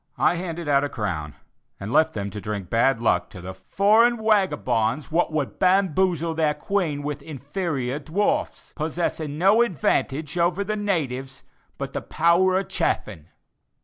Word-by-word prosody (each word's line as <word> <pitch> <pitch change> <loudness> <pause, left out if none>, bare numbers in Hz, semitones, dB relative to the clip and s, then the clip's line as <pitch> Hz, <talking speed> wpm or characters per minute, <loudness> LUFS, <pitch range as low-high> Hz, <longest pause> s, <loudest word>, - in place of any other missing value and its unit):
I - - +3
handed 170 -2 -5
out 140 -1 +3
a 145 - -1
crown, 85 - -4 0.4
and 105 +4 -5
left 160 0 +4
them 100 -1 -3
to 105 - -7
drink 100 -2 -5
bad 120 +2 +3
luck 90 -6 +2
to - - -11
the 90 +2 -7
"foreign 210 - +3
wagabonds 150 - +1
what 170 +1 +1
would 150 -3 -3
bamboozle 185 -3 +2
their 155 -2 +1
Queen 155 -4 -1
with 145 0 -4
inferior 145 -2 -3
dwarfs, 165 +8 -2
possessing 155 -2 -3
no 195 +7 +5
advantage 155 - 0
over 175 +3 +1
the 215 +2 -2
'natyves' 135 -11 -3 0.3
but - - -5
the - - -3
power 180 +3 +3
of 190 - -2
chaffing." 80 0 -2
155 Hz, 150 wpm, -24 LUFS, 130-185 Hz, 0.4 s, no